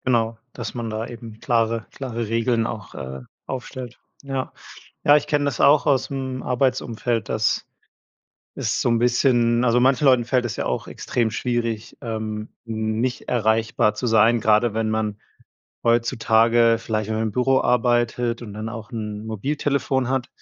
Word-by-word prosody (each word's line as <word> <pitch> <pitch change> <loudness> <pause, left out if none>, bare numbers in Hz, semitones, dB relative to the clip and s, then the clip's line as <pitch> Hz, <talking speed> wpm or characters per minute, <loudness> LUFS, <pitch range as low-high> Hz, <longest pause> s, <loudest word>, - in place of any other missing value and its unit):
Genau, 115 -3 +1 0.2
dass 120 -3 -6
man 120 -2 -4
da 110 +1 -3
eben 115 -2 -10
klare 115 -2 0
klare 120 -4 -4
Regeln 115 +1 +1
auch, 105 -4 -6
äh, 65 0 -6 0.2
aufstellt. 130 -1 -6 0.2
Ja. 135 -1 -3 0.5
Ja, 145 - +7
ich 150 0 -3
kenne 145 -1 +1
das 140 -5 -2
auch 145 +1 +5
aus'm 130 -2 -1
Arbeitsumfeld, 120 -3 -1
dass 110 -1 0 0.9
es - - -1
so - - +2
'n 115 - +3
bisschen 120 -1 +3
also, 120 0 +3
manchen 130 +3 +3
Leuten 130 -3 +5
fällt 125 0 +1
es 120 - -3
ja - - -3
auch - - -2
extrem 120 -2 -1
schwierig, 115 -2 -2
ähm, 110 -2 -4 0.2
nicht 110 +2 -2
erreichbar 110 -2 +2
zu 115 +4 -3
sein, 115 +1 +4
grade 110 +1 +3
wenn 110 0 0
man 110 -1 -1 0.6
heutzutage 115 0 +3
vielleicht 110 -1 -3
mal 110 0 0
im 110 -2 -1
Büro 130 +3 +3
arbeitet 120 0 +1
und 110 -3 -8
dann 110 +1 -5
auch 115 0 -8
'n 105 -1 -5
Mobiltelefon 135 +3 -1
hat, 130 -1 -1
115 Hz, 155 wpm, -23 LUFS, 110-125 Hz, 0.9 s, Ja